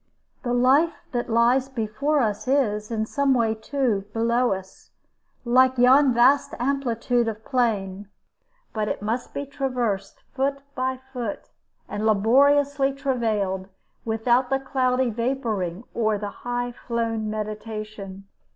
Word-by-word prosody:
The 245 - -3
life 275 +7 +4 0.2
that 240 -1 -2
lies 240 +3 +3
before 265 +5 0
us 210 0 -1
is, 215 -6 +1
in 220 -2 -1
some 275 +2 +1
way, 230 -2 +2
too, 220 -2 -1
below 235 +2 +2
us, 190 0 -6 0.6
like 255 +2 +4
yon 260 +3 +6
vast 265 +4 +4
amplitude 245 -2 0
of 220 0 -5
plain; 205 -6 -1 0.6
but 215 -1 -1
it - - -3
must 230 +4 -2
be 285 - -4
traversed 250 -8 -3
foot 275 +1 -1
by 260 0 -1 0.2
foot, 235 -5 -5 0.4
and 205 - -4
laboriously 275 +6 +3
travailed, 220 -9 -1 0.4
without 240 +3 +1
the 270 - +2
cloudy 260 -2 0
vaporing 225 -6 -2
or 220 -2 +1
the 205 0 -4
high 245 +2 -3
flown 230 -2 -3
meditation. 215 -2 -6
240 Hz, 125 wpm, -24 LUFS, 215-260 Hz, 0.6 s, yon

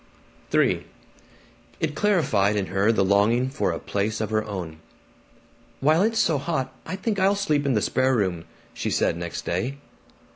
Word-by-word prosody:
III - - +2 1.0
It - - -1
clarified 135 - +2
in 100 -2 0
her 100 +3 +3
the 105 -4 +2
longing 110 +6 +2
for 135 - 0
a - - -3
place 105 +2 -2
of 110 0 -3
her 110 0 +1
own. 90 -7 -6 1.0
"While 155 +5 +3
it's 225 +2 +1
so 155 -8 +2
hot, 135 -4 -2
I - - -3
think 205 +1 -2
I'll 195 +2 +3
sleep 150 -8 0
in 135 - +2
the 105 - +1
spare 130 0 +2
room," 95 -6 -1 0.3
she - - -3
said - - +1
next 85 0 -5
day. 120 +11 -2
120 Hz, 170 wpm, -24 LUFS, 100-155 Hz, 1.0 s, her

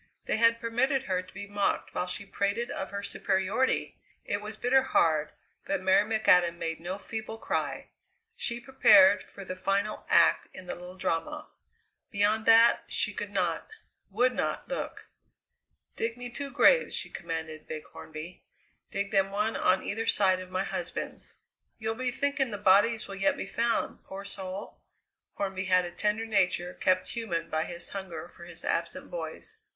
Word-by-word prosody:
They - - 0
had 230 0 +4
permitted 245 +4 +1
her 185 -6 0
to 185 - -16
be 200 - -7
mocked 205 0 -1
while 180 - -1
she 200 +3 -4
prated 200 +5 -1
of 190 - -4
her 200 0 -5
superiority! 200 +7 0 0.3
It 205 - -2
was 215 +1 -7
bitter 260 +2 +4
hard, 155 - +2 0.4
but 195 - 0
Mary 190 +3 +3
McAdam 180 -6 +4
made 165 -1 -3
no 180 +3 -4
feeble 220 +1 -6
cry - - -3 0.5
she 235 - -2
prepared 265 -2 +6
for 195 - -11
the 185 - -5
final 200 +3 -1
act - - +5
in 185 - -9
the 180 - -4
little 180 +1 -10
drama. 165 -3 -2 0.6
Beyond 215 +1 +1
that 230 +1 +6
she - - -1
could - - -5
not, - - -1 0.4
would 245 +6 +2
not - - -2
look. - - -5 0.9
"Dig 230 +1 -2
me 245 0 -7
two 280 +3 -5
graves," - - +4
she - - -4
commanded 160 -2 -5
Big 155 -1 -5
Hornby; 160 +3 -10 0.5
"dig 200 0 -3
them 195 0 +3
one 210 +3 0
on 185 +1 +2
either 225 +2 -3
side 185 -2 +4
of 185 0 -8
my 185 +1 -1
husband's." - - -5 0.4
"You'll 220 0 -2
be 255 +2 -2
thinking 280 +1 0
the 205 - -4
bodies 205 +3 +4
will 195 - -7
yet 195 0 +1
be - - -3
found, 230 +3 -1
poor 195 +1 -8
soul?" 190 0 -7 0.6
Hornby 190 -1 -2
had 185 -1 +3
a 175 - -6
tender 210 +4 0
nature 180 -4 +1
kept 185 0 +1
human 220 -8 -3
by 155 0 0
his 175 0 -3
hunger 185 -5 -6
for 170 - -11
his 170 0 -8
absent - - -2
boys. 450 -2 -6
200 Hz, 170 wpm, -29 LUFS, 185-230 Hz, 0.9 s, prepared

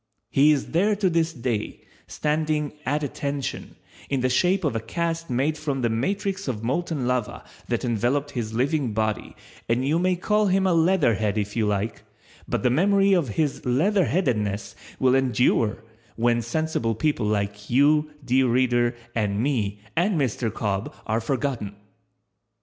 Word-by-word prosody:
He 145 +3 +5
is 145 - -1
there 200 +6 +2
to 195 -3 +1
this 165 0 +1
day, 120 -7 -4 0.2
standing 150 -1 -1
"at 150 +3 0
attention," 140 0 -4 0.3
in 135 -2 0
the 130 - +2
shape 180 +9 +2
of 145 -7 0
a - - +1
cast 165 +7 -3
made 140 +5 0
from 140 -4 -2
the 120 - +2
matrix 195 - -2
of 115 -4 -3
molten 145 +2 -1
lava 125 -3 -1 0.2
that - - -1
enveloped 125 +5 0
his 115 -4 -3
living 130 +1 0
body 110 0 -2 0.3
and 125 +3 +1
you 160 +4 +2
may 185 +1 +2
call 210 +4 +1
him 190 0 +2
a 185 - +3
leatherhead 145 - +2
if 105 -1 -2
you 110 -2 +1
like, 105 +2 -2 0.5
but - - -2
the 125 - +3
memory 195 +6 +3
of 175 -7 +2
his 150 -3 0
leatherheadedness 130 - +1 0.3
will 130 -1 +4
endure 125 -4 +2 0.3
when 120 0 +2
sensible 155 -6 -1
people 120 -2 0
like 105 0 -2
you, 150 +4 +4 0.2
dear 130 +1 +3
reader, 120 0 +2 0.2
and 105 -3 0
me 110 -6 -1
and 175 +1 +2
Mr. 120 -4 -1
Cobb 100 -1 -3
are 110 +1 0
forgotten. 120 -5 -2
130 Hz, 155 wpm, -24 LUFS, 115-160 Hz, 0.5 s, He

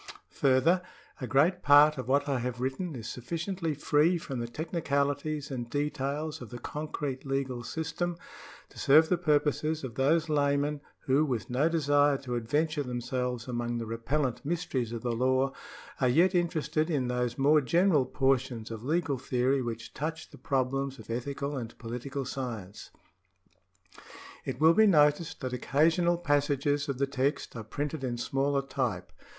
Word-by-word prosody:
Further, 140 +7 +3 0.4
a 130 - -3
great 160 - +3
part 145 0 +6
of 130 - -5
what 140 +2 +2
I 135 -3 0
have 125 0 -3
written 135 +6 -3
is 115 -2 -7
sufficiently 165 +5 -3
free 150 +5 +3
from 135 -6 -5
the 120 - -3
technicalities 145 0 -2
and 120 -3 -4
details 145 +2 -2
of 120 - -8
the 120 - -7
concrete 145 0 -5
legal 135 -3 -2
system 165 +4 -3 0.5
to - - -13
serve 155 +3 +6
the 180 - +3
purposes 155 -1 +1
of 130 -3 -5
those 155 +6 +2
laymen 145 -1 +1 0.2
who, 135 +3 +2
with 125 -7 -2
no 140 +6 +2
desire 145 -3 +3
to 130 -2 -6
adventure 145 +7 0
themselves 125 -1 -3
among 120 -1 -2
the 115 - -3
repellent 120 +4 -2
mysteries 145 -7 -2
of 115 -1 -5
the 120 - 0
law, 130 +3 +1 0.5
are 130 - +3
yet 170 +9 +4
interested 160 -3 0
in 140 -6 0
those 125 -1 -1
more 150 +3 +4
general 165 -1 +3
portions 130 -4 0
of 110 -1 -6
legal 150 -1 0
theory 130 +2 +1
which 115 -2 -5
touch 160 +2 -5
the - - -13
prob 130 -4 0
lems 135 0 -2
of - - -10
ethical 140 +4 -3
and 115 -3 -6
political 125 +4 -5
science. 115 -7 -6 1.6
It - - -4
will 160 +2 +6
be 220 +4 +5
noticed 150 -1 +3
that 130 -2 -3
occasional 165 +7 +2
passages 145 -2 +1
of 135 - -2
the 140 - +2
text 140 +1 -2
are 115 - -5
printed 145 +5 -4
in 120 -2 -2
smaller 135 +3 0
type. 135 - -3
140 Hz, 160 wpm, -29 LUFS, 125-155 Hz, 1.6 s, part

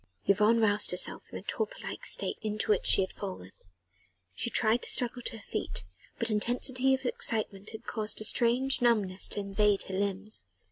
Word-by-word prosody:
Yvonne 210 +3 +3
roused 210 -2 +1
herself 180 - +1
from - - -7
the - - -10
torpor 445 +3 -3
like - - -5
state - - -1
into 215 0 -1
which 205 - +1
she - - +8
had 190 - -3
fallen. 185 - -7 0.8
She 235 - -3
tried 230 +1 +2
to - - +2
struggle 245 0 +2
to 230 - -6
her 210 - -14
feet, 90 - -4 0.3
but 230 -1 0
intensity 250 +4 +1
of 265 - -9
excitement 220 - -1
had 220 +1 -10
caused 215 -2 -3
a - - +1
strange 245 +4 +3
numbness 210 -6 +1
to - - -1
invade 200 0 +1
her 190 - -8
limbs. 200 - -1
215 Hz, 185 wpm, -29 LUFS, 200-240 Hz, 0.8 s, she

